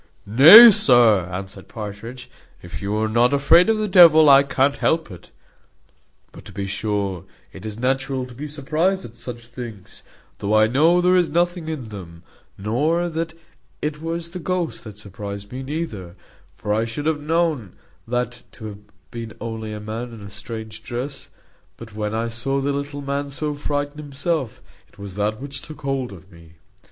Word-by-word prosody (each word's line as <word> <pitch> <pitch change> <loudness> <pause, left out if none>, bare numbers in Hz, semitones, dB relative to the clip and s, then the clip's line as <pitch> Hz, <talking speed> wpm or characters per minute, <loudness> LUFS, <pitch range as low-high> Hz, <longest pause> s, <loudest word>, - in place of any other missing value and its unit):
"Nay, 160 - +10
sir," 115 - +5
answered 95 +1 -7
Partridge, 115 +4 -8 0.4
"if 85 - -8
you 100 +1 -2
are 110 0 0
not 120 +5 +2
afraid 165 +8 +5
of 220 - +2
the 215 0 -1
devil, 165 -5 +7
I 135 0 +8
can't 140 0 +1
help 160 -9 0
it; 90 - -13 1.0
but - - -13
to - - -11
be 100 0 -5
sure, 100 -2 -3 0.3
it 95 +3 -9
is 105 0 -7
natural 130 +1 -1
to 125 - -12
be 145 +5 -7
surprized 160 +6 -1
at 115 - -12
such 120 0 -9
things, 115 -5 -9 0.4
though 105 +2 0
I 110 - +5
know 160 +10 +3
there 180 +1 +3
is 180 -2 +2
nothing 175 -1 0
in 135 -8 -5
them: 85 -5 -10 0.3
not 150 - 0
that 165 0 -4 0.4
it 150 0 -4
was 165 +1 -4
the 180 - -6
ghost 180 -1 -3
that 105 -2 -10
surprized 100 0 -8
me, 130 +1 -6
neither; 130 - -5 0.4
for 105 0 -2
I 110 +2 +1
should 115 +6 -5
have 155 -2 0
known 155 - -1 0.3
that 120 0 -3
to 110 - -11
have 100 -1 -10 0.3
been 115 -1 -7
only 110 -1 -6
a 105 - -6
man 115 +3 -6
in 110 - -11
a 100 0 -10
strange 110 +1 -8
dress; 125 +5 -6 0.5
but 110 -2 -12
when 105 0 -3
I 115 +1 -1
saw 135 +4 -2
the 140 +1 -1
little 140 0 -4
man 140 +1 -3
so 150 +2 -3
frightened 145 0 -3
himself, 145 -3 -3 0.3
it - - -26
was 100 -2 -9
that 105 +2 -2
which 140 0 -7
took 155 - -11
hold 135 -4 -2
of 95 0 -14
me." 85 -1 -17
125 Hz, 180 wpm, -21 LUFS, 105-150 Hz, 1.0 s, Nay